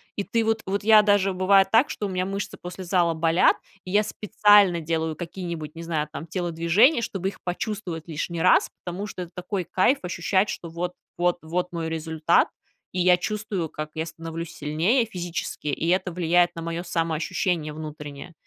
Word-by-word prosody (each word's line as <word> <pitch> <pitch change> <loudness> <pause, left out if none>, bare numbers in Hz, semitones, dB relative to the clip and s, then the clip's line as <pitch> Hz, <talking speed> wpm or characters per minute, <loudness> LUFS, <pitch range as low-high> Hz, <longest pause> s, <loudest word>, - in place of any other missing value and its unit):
И 200 - -2
ты 230 +2 0
вот 225 0 +1
вот 200 +1 -1
я 215 0 +8
даже 205 -2 +3
бывает 195 +1 +4
так, 230 +5 +5
что 210 - -4
у 200 - -2
меня 185 0 -1
мышцы 195 +1 -4
после 180 +1 -7
зала 175 -2 +2
болят, 165 +2 +4 0.3
и 185 - -9
я 205 +3 +3
специально 205 -3 +4
делаю 160 0 -2
какие-нибудь, 170 -3 -6
не 165 - -8
знаю, 160 -3 -2
там 155 +2 -6
телодвижения, 175 - +3
чтобы 195 -4 -2
их - - -12
почувствовать 180 -3 -4
лишний 165 +1 -3
раз. 185 - +5 0.2
Потому 185 +3 -4
что 185 -2 -6
это 175 - -12
такой 185 +1 -3
кайф 185 - +2
ощущать, 190 +3 +1
что 170 - -5
вот 175 +2 -4 0.2
вот 175 0 +2
вот 175 +3 -2
мой 165 -2 -3
результат, 160 0 +2 0.4
и 185 - -3
я 180 0 +5
чувствую, 205 -4 -3
как 155 +1 -6
я 160 - -2
становлюсь 165 0 -7
сильнее 165 - +1
физически, 175 -6 -5
и 155 +3 -1
это 185 0 +1
влияет 175 0 +3
на 165 - -5
моё 170 +1 -4
самоощущение 165 -1 -1
внутреннее. 150 +1 -8
175 Hz, 180 wpm, -25 LUFS, 165-195 Hz, 0.4 s, я